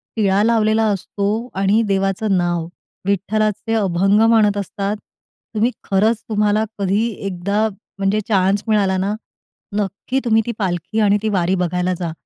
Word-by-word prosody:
टिळा 200 -2 +2
लावलेला 220 -1 +3
असतो 205 +4 -2
आणि 205 +4 +3
देवाचं 195 0 +1
नाव, 175 -2 0 0.4
विठ्ठलाचे 215 +3 0
अभंग 195 0 +2
म्हणत 210 -3 +4
असतात. 200 +1 -2 0.6
तुम्ही 230 +4 +2
खरंच, 215 +3 +1
तुम्हाला 210 0 +2 0.2
कधी 200 +4 +1 0.2
एकदा 200 +4 0 0.3
म्हणजे 195 +2 +1
चान्स 195 -1 +2
मिळाला 200 -3 +2
ना, 195 +3 -1 0.6
नक्की 205 +6 -2
तुम्ही 225 -1 +4
ती 240 - -2
पालखी 185 +2 -2
आणि 205 0 +4
ती 215 - +1
वारी 185 -1 +1
बघायला 180 0 0
जा. 170 -2 -2
200 Hz, 135 wpm, -19 LUFS, 190-215 Hz, 0.6 s, म्हणत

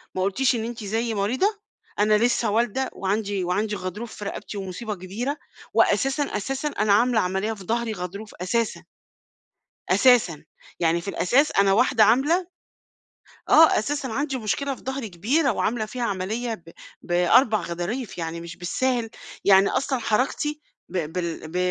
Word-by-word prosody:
ما 185 - -1
قُلتيش 240 +7 +2
إن 225 -1 -2
أنتِ 235 -1 -6
زيي 225 +3 -1
مريضة، 255 - 0 0.4
أنا 210 +1 +4
لسّه 235 -1 +1
والدة 240 +4 0
وعندي 200 0 -1
وعندي 205 +4 -1
غضروف 205 +5 -6
في 205 - -7
رقبتي 205 +1 -6
ومصيبة 200 +3 -5
كبيرة، 210 - -4 0.4
وأساسًا، 270 +2 +3
أساسًا 270 +3 -3
أنا 215 -7 +1
عاملة 240 +2 +3
عملية 190 +3 -1
في 200 -3 -11
ضهري 230 +3 -1
غضروف 200 +3 -7
أساسًا. 230 +4 -1 1.1
أساسًا، 235 - +4 0.4
يعني 170 0 +2
في 200 - -11
الأساس 255 +9 +2
أنا 195 0 +3
واحدة 215 +1 +4
عاملة 290 - +3 1.0
آه 325 0 +7
أساسًا 280 +5 -2
عندي 270 +3 -2
مشكلة 270 +5 -1
في - - -16
ضهري 265 -3 -4
كبيرة، 245 - +1
وعاملة 220 +1 -1
فيها 245 +3 -6
عملية 220 +3 -2
ب 165 -5 -14 0.3
ب4 190 +6 +3
غضاريف 175 +7 -4
يعني 165 0 -4
مش 170 0 -9
بالساهل، 235 +6 -1 0.3
يعني 195 0 +6
أصلًا 270 -1 0
حركتي 265 +7 -1 0.3
ب 170 -3 -3
بال 170 -3 -4
ب 165 - -7
215 Hz, 150 wpm, -24 LUFS, 190-250 Hz, 1.1 s, آه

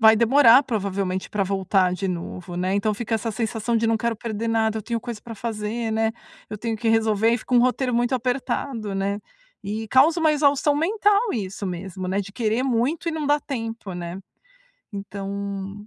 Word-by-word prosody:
vai 220 0 +7
demorar, 245 +3 +6
provavelmente, 195 -4 -2
pra 205 -2 0
voltar 190 -1 +1
de 195 +1 -3
novo, 175 0 -5
né, 185 +2 0
então 210 +1 +1
fica 225 +2 -2
essa 225 +1 -1
sensação 225 +1 -1
de 225 0 +1
"não 225 0 +3
quero 235 0 -1
perder 225 0 -3
nada, 220 -1 +1
eu - - -6
tenho 235 +2 -2
coisa 235 -3 -6
para 230 - -8
fazer, 220 +1 -3
né. 220 0 +1 0.4
Eu 215 - -5
tenho 225 +1 -2
que 225 +1 -1
resolver", 225 -1 +3
e 235 - +1
fica 250 - -3
um 240 - +7
roteiro 255 0 +1
muito 240 +2 +1
apertado, 245 -3 -2
né, 200 +1 -1 0.4
e 215 +2 -4
causa 285 +8 +5
uma 315 -2 +4
exaustão 290 0 +3
mental 410 +7 +2
isso 200 -2 -4
mesmo, 185 +1 -5
né, 195 +2 0
de 200 0 -8
querer 225 +3 0
muito 270 +7 0
e 330 - -1
não 315 -1 -3
dá 290 +1 +4
tempo, 225 -8 -5
né, 175 +1 -5 0.7
então 200 0 -5
225 Hz, 195 wpm, -23 LUFS, 200-245 Hz, 0.7 s, vai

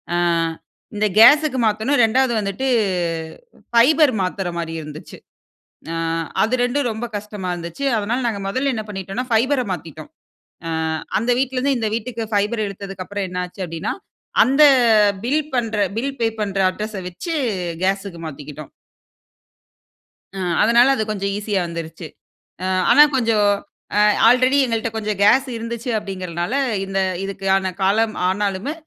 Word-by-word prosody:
அ - - +1 0.8
இந்த 210 +1 +1
கேஸுக்கு 290 +3 +6
மாத்தணும். 220 +6 +1
2 245 +2 +2
வந்துட்டு 205 +6 -3 1.1
ஃபைபர் 280 +4 +5
மாத்துற 185 0 -2
மாதிரி 165 -1 -4
இருந்துச்சு. 150 0 -10 0.8
அ - - -3 0.5
அது 225 +4 0
2 250 +1 0
ரொம்ப 225 +2 -4
கஷ்டமா 205 -3 -5
இருந்துச்சு. 170 +9 -6
அதுனால 240 +5 -2
நாங்க 210 -3 -3
மொதல 265 +6 0
என்ன 220 - -4
பண்ணிட்டோம்னா, 195 +5 -4
ஃபைபர்ர 255 +4 +2
மாத்திட்டோம். 165 - -8 0.6
அ - - -3 0.5
அந்த 235 +3 0
வீட்டுல 265 0 -1
இருந்து 270 0 +1
இந்த 220 - -1
வீட்டுக்கு 230 0 -4
பைபர்ர 210 +2 0
எடுத்ததற்கு 195 -1 -7
அப்புறம், 205 -1 -3
என்னச்சி 180 +1 -5
அப்டீன்னா, 165 0 -3 0.5
அந்த 275 +5 +2 0.6
பில் 290 +5 +2
பண்ணுகுற 220 -3 0 0.2
பில் 275 +4 -2
பே 230 - +3
பண்ணுகுற 195 -2 0
அட்ரஸ 215 +3 -6
வைச்சி 180 - -5 0.5
கேஸ்க்கு 195 -2 -1
மாத்திக்கிட்டோம். 150 0 -9 1.7
ம். 180 -3 -1
அதனால 235 +4 +5
அது 220 - -1
கொஞ்சம் 200 -1 -2
ஈஸியா 205 -2 -1
வந்துருச்சு. 165 0 -7 0.6
அ - - -1 0.2
ஆனா 295 - +8
கொஞ்சம் 225 -4 +2 0.5
அ - - +5 0.3
ஆல்ரெடி 255 +3 +4
எங்கள்ட்ட 230 -1 -1
கொஞ்சம் 210 -2 -3
கேஸ் 260 +6 +5
இருந்துச்சு 230 +2 -5
அப்படிங்கிறனால, 185 0 -4 0.3
இந்த 195 0 -3 0.3
இதுக்கான 195 -1 0
காலம் 215 +3 +2
ஆனாலுமே, 200 +6 -1
210 Hz, 135 wpm, -20 LUFS, 190-245 Hz, 1.7 s, ஆனா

